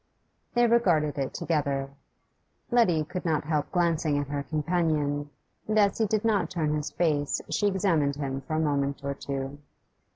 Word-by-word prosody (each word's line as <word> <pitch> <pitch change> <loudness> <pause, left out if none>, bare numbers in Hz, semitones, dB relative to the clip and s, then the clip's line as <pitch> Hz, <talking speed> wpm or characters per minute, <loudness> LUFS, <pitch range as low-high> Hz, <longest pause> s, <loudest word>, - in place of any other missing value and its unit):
They 240 0 +5
regarded 175 -12 +2
it 135 - -1
together. 140 -4 -1 0.8
Letty 185 -10 +4
could 180 +4 -5
not 160 -2 0
help 150 -1 -1
glancing 165 -4 +1
at 145 -1 -2
her 145 0 -2
companion, 150 -2 0 0.4
and 215 0 +1
as 200 0 +3
he 220 - +3
did 215 +1 0
not 215 -3 +2
turn 155 -5 -1
his 150 -1 -2
face 150 -4 0
she 205 - +2
examined 170 -8 +1
him 135 -2 -3
for 155 +4 -4
a - - +1
moment 140 -2 0
or 140 0 -1
two. 140 0 -5
155 Hz, 165 wpm, -27 LUFS, 145-180 Hz, 0.8 s, They